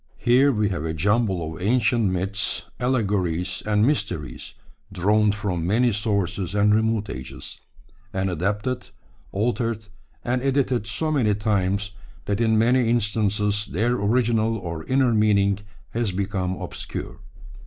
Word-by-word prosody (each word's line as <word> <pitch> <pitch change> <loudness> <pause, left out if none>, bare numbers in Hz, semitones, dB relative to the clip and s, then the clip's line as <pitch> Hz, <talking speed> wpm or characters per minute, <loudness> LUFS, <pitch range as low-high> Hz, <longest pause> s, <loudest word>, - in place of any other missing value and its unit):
Here 130 +4 +4
we 105 -4 +1
have 90 -6 -3
a 80 0 -2
jumble 95 -3 +1
of 80 - -10
ancient 115 0 +2
myths, 95 +2 -1 0.2
allegories, 95 -7 0
and 105 0 +3
mysteries 145 +2 -2 0.4
drawn 105 +3 +3
from 95 -6 -2
many 120 +5 +3
sources 100 -3 -1
and 105 0 +4
remote 110 -1 +1
ages, 65 +2 -7 0.5
and 95 -1 -1
adapted, 105 +8 -2 0.4
altered, 115 +1 -1 0.4
and 125 +1 0
edited 130 -5 +1
so 155 +9 -1
many 115 -9 +2
times 100 -1 0 0.3
that 100 +2 -1
in 110 -1 +3
many 120 +1 +3
instances 105 -2 +1
their 115 +7 0
original 115 0 +1
or 85 -5 -5
inner 130 -2 +2
meaning 100 -2 +3 0.3
has 115 -3 -1
become 95 -1 -2
obscure. - - -6
105 Hz, 130 wpm, -24 LUFS, 95-115 Hz, 0.5 s, Here